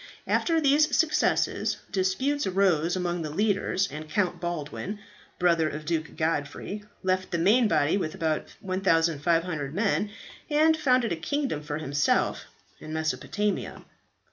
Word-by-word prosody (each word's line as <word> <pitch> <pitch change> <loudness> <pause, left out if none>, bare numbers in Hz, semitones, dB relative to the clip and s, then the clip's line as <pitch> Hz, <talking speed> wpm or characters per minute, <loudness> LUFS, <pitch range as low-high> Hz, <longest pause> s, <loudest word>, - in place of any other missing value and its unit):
After 330 -1 +2
these 295 +1 +3
successes 325 -2 +1
disputes 200 +9 0
arose 180 -3 +2
among 175 -1 -1
the 155 - -4
leaders, 195 +2 +1
and 155 +1 -7
Count 180 -2 0
Baldwin, 175 +4 -4 0.4
brother 170 -3 +3
of 155 0 -7
Duke 160 -2 -2
Godfrey, 160 +6 -2 0.2
left 185 0 0
the 170 - -1
main 215 +8 +4
body 155 -1 +2
with 160 -4 -3
about 160 -4 -1
1500 165 -4 +1
men, 205 +1 +1 0.4
and 310 +2 +4
founded 255 - +2
a - - +1
kingdom 215 - -2
for 150 0 -4
himself 145 -2 0 0.3
in 155 - -8
Mesopotamia. 160 +7 -2
180 Hz, 130 wpm, -27 LUFS, 155-205 Hz, 0.4 s, main